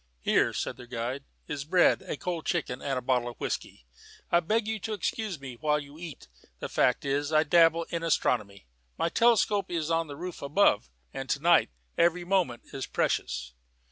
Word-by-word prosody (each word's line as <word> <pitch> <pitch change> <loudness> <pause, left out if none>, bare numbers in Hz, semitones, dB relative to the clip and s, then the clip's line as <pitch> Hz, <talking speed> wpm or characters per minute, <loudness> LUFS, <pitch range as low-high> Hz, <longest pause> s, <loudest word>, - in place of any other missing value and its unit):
"Here," - - +3
said - - -3
their 125 -1 -11
guide, 125 +3 -4 0.2
"is 145 -2 -4
bread, 175 +4 +4
a - - -5
cold 175 -3 -4
chicken, 135 -7 -1
and 135 -2 -1
a 125 - -3
bottle 125 -1 +1
of 120 - -11
whisky. - - -4 0.5
I 170 - +6
beg 215 +6 0
you 220 0 -2
to 220 +2 -4
excuse 205 -2 -3
me 130 -3 -8
while 150 +3 +1
you 145 +1 -11
eat. 165 - -9 0.3
The - - -5
fact 125 - +2
is, 145 +2 0
I 155 0 +5
dabble 165 +1 +4
in 170 - -2
astronomy. 105 - 0 0.3
My 170 - +1
telescope 210 -2 +3
is 165 -2 -2
on 165 0 +1
the 145 -1 -8
roof 180 +1 -6
above, 140 - +3 0.2
and 135 0 -6
to 140 - +1
night 170 +2 +4 0.3
every 175 +1 +3
moment 175 -11 0
is 135 - -4
precious." 60 0 -1
155 Hz, 190 wpm, -28 LUFS, 130-175 Hz, 0.5 s, I